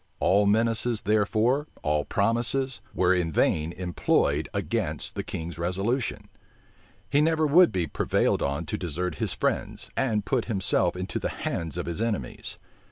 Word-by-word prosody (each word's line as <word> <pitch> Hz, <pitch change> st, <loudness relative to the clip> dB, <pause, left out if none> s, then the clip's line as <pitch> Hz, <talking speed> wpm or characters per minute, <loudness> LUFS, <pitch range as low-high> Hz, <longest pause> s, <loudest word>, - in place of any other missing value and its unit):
All 100 Hz, +2 st, +3 dB
menaces 115 Hz, +1 st, +2 dB
therefore, 110 Hz, +7 st, +2 dB, 0.2 s
all 75 Hz, 0 st, +1 dB
promises, 120 Hz, +5 st, +1 dB
were 90 Hz, 0 st, +3 dB
in 90 Hz, -3 st, 0 dB
vain 80 Hz, +1 st, +1 dB
employed 90 Hz, 0 st, 0 dB
against -, -, -2 dB
the -, -, -3 dB
king's 85 Hz, +1 st, -6 dB
resolution: 100 Hz, +9 st, -1 dB, 0.8 s
he 145 Hz, -, +3 dB
never 160 Hz, 0 st, +2 dB
would 170 Hz, +4 st, +6 dB
be 90 Hz, -3 st, 0 dB
prevailed -, -, +1 dB
on 70 Hz, 0 st, -1 dB
to -, -, -4 dB
desert 90 Hz, +1 st, -3 dB
his -, -, 0 dB
friends, -, -, -2 dB
and 110 Hz, -6 st, 0 dB
put 130 Hz, -4 st, 0 dB
himself 95 Hz, -5 st, +1 dB
into 90 Hz, +1 st, -3 dB
the -, -, -2 dB
hands 85 Hz, +1 st, -3 dB
of 90 Hz, -, -2 dB
his 85 Hz, +4 st, -3 dB
enemies. 115 Hz, -3 st, -3 dB
100 Hz, 150 wpm, -26 LUFS, 85-120 Hz, 0.8 s, would